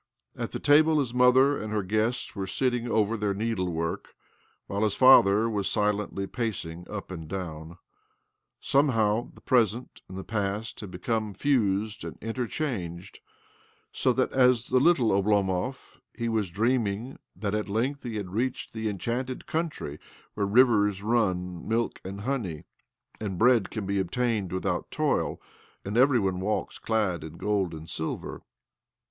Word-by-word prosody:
At -, -, -4 dB
the -, -, -4 dB
table 155 Hz, +2 st, +5 dB
his 130 Hz, -5 st, 0 dB
motl 130 Hz, +3 st, +5 dB
and 105 Hz, 0 st, -5 dB
her 105 Hz, -2 st, 0 dB
guests 110 Hz, +6 st, -1 dB
were 95 Hz, -2 st, -3 dB
sitting 120 Hz, +3 st, 0 dB
oven 110 Hz, +1 st, +1 dB
their 100 Hz, -1 st, 0 dB
need 110 Hz, 0 st, -2 dB
work, 85 Hz, -2 st, -3 dB, 0.5 s
while 100 Hz, +1 st, -3 dB
his 105 Hz, -2 st, +1 dB
father 115 Hz, -4 st, +6 dB
was 105 Hz, -4 st, -1 dB
silently 105 Hz, -1 st, 0 dB
paci 90 Hz, -6 st, -4 dB
up 100 Hz, -3 st, -6 dB
and 80 Hz, -4 st, -7 dB
down. 85 Hz, -2 st, -6 dB, 0.8 s
Somehow 115 Hz, -5 st, +2 dB
the -, -, -16 dB
present 120 Hz, -1 st, +1 dB
and 95 Hz, -, -8 dB
t 95 Hz, -, -5 dB
past 105 Hz, +1 st, -3 dB
had 105 Hz, -, -7 dB
become 105 Hz, +2 st, -2 dB
fused 110 Hz, -6 st, 0 dB
and -, -, -7 dB
interchang< 115 Hz, -, -4 dB, 0.8 s
so 130 Hz, -, +2 dB
that, 130 Hz, +1 st, +1 dB
as 125 Hz, -3 st, +3 dB
the 130 Hz, -, +4 dB
little 135 Hz, -6 st, +4 dB
Oblomov, 100 Hz, +4 st, 0 dB, 0.2 s
he 120 Hz, -, -2 dB
w 110 Hz, -2 st, +1 dB
dreaming 110 Hz, +4 st, -1 dB, 0.2 s
that 100 Hz, -2 st, -3 dB
at 105 Hz, -1 st, -2 dB
length 130 Hz, +7 st, -1 dB
he 115 Hz, -3 st, -5 dB
had 100 Hz, -4 st, -4 dB
reached 125 Hz, +4 st, -2 dB
t 110 Hz, -1 st, -2 dB
enchanted 120 Hz, +6 st, -3 dB
country 155 Hz, -, -3 dB, 0.3 s
where 100 Hz, -1 st, -1 dB
the -, -, -5 dB
rivers 105 Hz, -5 st, +4 dB
run 95 Hz, -5 st, 0 dB
m 115 Hz, +1 st, +2 dB
and 95 Hz, +2 st, -6 dB
honey, 105 Hz, -, -3 dB, 0.6 s
and 100 Hz, -4 st, -4 dB
bread 120 Hz, -2 st, +4 dB
can 110 Hz, -3 st, -4 dB
be 100 Hz, 0 st, 0 dB
obtain 105 Hz, +2 st, 0 dB
without 95 Hz, 0 st, -2 dB
toil, -, -, 0 dB, 0.5 s
and 100 Hz, +2 st, -4 dB
every 130 Hz, +1 st, +5 dB
one 95 Hz, -3 st, -1 dB
walks 105 Hz, +3 st, -2 dB
clad 90 Hz, -8 st, -1 dB
gold 100 Hz, -5 st, 0 dB
and 80 Hz, +1 st, -9 dB
silver. 80 Hz, 0 st, -4 dB
105 Hz, 155 wpm, -27 LUFS, 95-120 Hz, 0.8 s, father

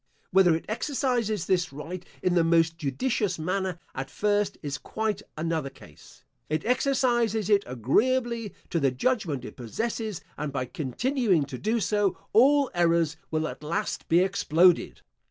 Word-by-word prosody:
Whether 180 Hz, -3 st, +5 dB
it 165 Hz, -, -5 dB
exercises 235 Hz, -, -1 dB
this 180 Hz, -2 st, +1 dB
right 165 Hz, +6 st, -7 dB, 0.2 s
in 180 Hz, -, +2 dB
the 170 Hz, -2 st, +4 dB
most 165 Hz, 0 st, +3 dB
judicious 185 Hz, -, -1 dB
manner 185 Hz, +2 st, -2 dB, 0.2 s
at 135 Hz, 0 st, -5 dB
first 205 Hz, +2 st, 0 dB
is 145 Hz, -1 st, -3 dB
quite 220 Hz, -1 st, -2 dB, 0.2 s
another 160 Hz, -3 st, -1 dB
case. -, -, -17 dB, 0.3 s
It 155 Hz, 0 st, -1 dB
exercises 240 Hz, -4 st, +1 dB
it 200 Hz, -1 st, +5 dB
agreeably 230 Hz, -, +1 dB, 0.2 s
to 170 Hz, -, +1 dB
the 140 Hz, -3 st, +3 dB
judgment 155 Hz, -, -1 dB
it -, -, -9 dB
possesses; 215 Hz, -, -3 dB, 0.2 s
and 150 Hz, -1 st, -3 dB
by 130 Hz, -2 st, -2 dB
continuing 180 Hz, -, 0 dB
to 135 Hz, -2 st, -7 dB
do 225 Hz, +2 st, 0 dB
so, 205 Hz, -3 st, +1 dB, 0.2 s
all 275 Hz, +5 st, +5 dB
errors 170 Hz, -2 st, +2 dB
will 155 Hz, 0 st, -1 dB
at -, -, -8 dB
last 170 Hz, +8 st, -3 dB
be 170 Hz, +2 st, +5 dB
exploded. 180 Hz, -2 st, +3 dB
185 Hz, 150 wpm, -27 LUFS, 155-220 Hz, 0.3 s, Whether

